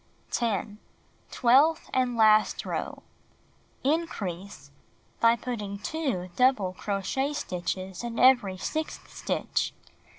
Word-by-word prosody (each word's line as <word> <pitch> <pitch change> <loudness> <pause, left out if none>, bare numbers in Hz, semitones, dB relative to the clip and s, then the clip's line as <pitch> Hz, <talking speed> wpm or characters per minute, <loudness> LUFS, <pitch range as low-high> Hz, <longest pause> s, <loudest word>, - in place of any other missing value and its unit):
10. 210 -2 -1 0.5
Twelfth 275 +7 +4
and 250 -2 +1
last 215 -1 +4
row: - - -4 0.8
"Increase," 200 - -3 0.5
by 230 0 +5
putting 210 -5 -5
2 220 - -3
double 250 -8 +3
crochet 205 +9 -2
stitches 185 -5 -4
in 235 -1 -5
every 240 -8 +5
sixth 310 +11 -4
stitch. - - -2
230 Hz, 95 wpm, -27 LUFS, 195-260 Hz, 0.8 s, by